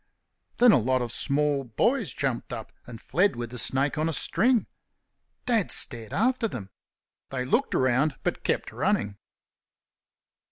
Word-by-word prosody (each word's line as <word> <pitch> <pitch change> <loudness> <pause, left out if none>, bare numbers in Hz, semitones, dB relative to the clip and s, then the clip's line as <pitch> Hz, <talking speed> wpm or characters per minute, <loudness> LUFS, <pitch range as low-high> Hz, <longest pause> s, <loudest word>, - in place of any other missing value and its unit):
Then 245 -1 +7
a - - +5
lot 130 +2 +1
of 120 - -5
small 145 +1 0
boys 200 - 0
jumped 130 -4 -3
up 110 - -7 0.2
and 115 -2 -9
fled 180 - +1
with 120 -1 -5
the 125 - -3
snake 140 +5 +1
on 155 +1 +1
a - - -2
string. 240 - +2 0.8
Dad 230 -6 +1
stared 115 -5 +1
after 245 +3 +1
them. 100 - -7 0.6
They 130 -2 -3
looked 235 - 0
round, 130 +3 +2
but - - -2
kept - - -1
running. 100 -1 -1
135 Hz, 150 wpm, -26 LUFS, -, 0.8 s, Then